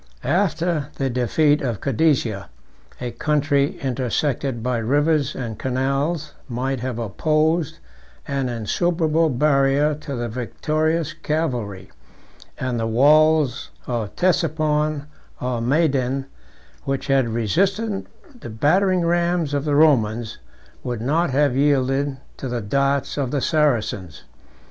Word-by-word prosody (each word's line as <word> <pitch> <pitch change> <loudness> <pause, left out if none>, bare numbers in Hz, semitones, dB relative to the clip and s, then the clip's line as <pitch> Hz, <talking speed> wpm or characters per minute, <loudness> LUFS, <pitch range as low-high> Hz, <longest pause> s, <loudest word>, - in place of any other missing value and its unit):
After 165 -1 0
the 135 -1 -1
defeat 145 +5 +2
of 120 -7 -2
Cadesia, 130 -7 0 0.5
a 125 -1 -4
country 145 +1 +1
intersected 130 -1 -1
by 125 -1 0
rivers 145 +4 +1
and 115 -4 -5
canals 140 +5 -1 0.2
might 130 +2 -2
have 125 -1 -4
opposed 155 - 0 0.5
an 135 -3 -1
insuperable 160 - +1
barrier 140 +2 +2
to 150 -1 -6
the 120 -1 -3
victorious 155 +7 -1
cavalry; 135 - -3 0.7
and 125 -2 -2
the 115 - -1
walls 145 +2 +3 0.2
of 115 -4 -3
Ctesiphon 155 -4 +1 0.3
or 125 -2 -2
Madayn, 135 -1 +1 0.6
which 135 0 -2
had 135 -4 +2
resisted 195 - 0 0.3
the 155 - -8
battering 180 - +2
rams 170 -2 +1
of 145 0 -1
the 145 -1 +1
Romans, 120 -7 +2 0.4
would 120 -3 -3
not 160 +8 +1
have 140 -1 +2
yielded 135 0 +1 0.2
to 135 - -5
the 120 -1 -2
darts 140 +7 0
of 135 -3 -1
the 145 - -1
Saracens. 120 - 0
140 Hz, 115 wpm, -22 LUFS, 125-155 Hz, 0.7 s, walls